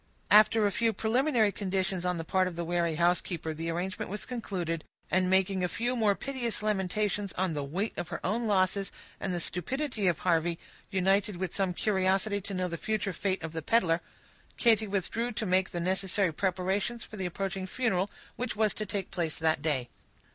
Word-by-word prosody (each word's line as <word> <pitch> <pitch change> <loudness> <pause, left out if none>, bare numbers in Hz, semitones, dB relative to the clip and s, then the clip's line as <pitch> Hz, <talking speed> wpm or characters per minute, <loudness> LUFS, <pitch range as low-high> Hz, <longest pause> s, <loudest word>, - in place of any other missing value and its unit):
After 215 +1 +7
a 205 - +2
few 230 +3 +2
preliminary 230 +1 +2
conditions 190 -2 -1
on 180 -1 0
the 165 - -3
part 185 +3 +2
of 180 - -5
the 170 - -2
wary 170 -1 +1
housekeeper, 170 -1 +1
the 165 +2 -4
arrangement 180 +3 -3
was 210 +2 -4
concluded; 185 -9 -3 0.3
and 185 0 +3
making 190 0 +2
a - - +3
few 240 +6 -1
more 215 -4 +3
piteous 245 -5 -2
lamentations 205 0 0
on 185 -2 0
the 145 -2 -2
weight 185 +10 -2
of 175 - -3
her 170 - -4
own 225 +5 0
losses 195 0 +2 0.3
and 190 - -2
the 175 - -1
stupidity 220 - -1
of 170 -3 +3
Harvey, 170 -1 +1 0.3
united 195 +1 +2
with 180 -1 -3
some 195 -2 +1
curiosity 195 +1 +1
to 200 +1 -5
know 185 0 0
the 170 -1 -4
future 215 0 -1
fate 185 0 -1
of 160 0 -5
the 160 - -3
peddler, 170 -3 +2 0.6
Katy 225 -2 +4
withdrew 220 +5 -1
to 215 - -2
make 185 0 +2
the 175 - -4
necessary 185 0 +1
preparations 190 +6 -1
for - - -10
the 190 -2 -1
approaching 190 +1 -3
funeral, 200 -4 0 0.3
which 250 -1 -2
was 215 -1 +2
to 215 - -4
take 195 -1 -3
place 165 -4 -2
that 160 -2 +1
day. 140 -6 0
190 Hz, 190 wpm, -30 LUFS, 175-210 Hz, 0.6 s, After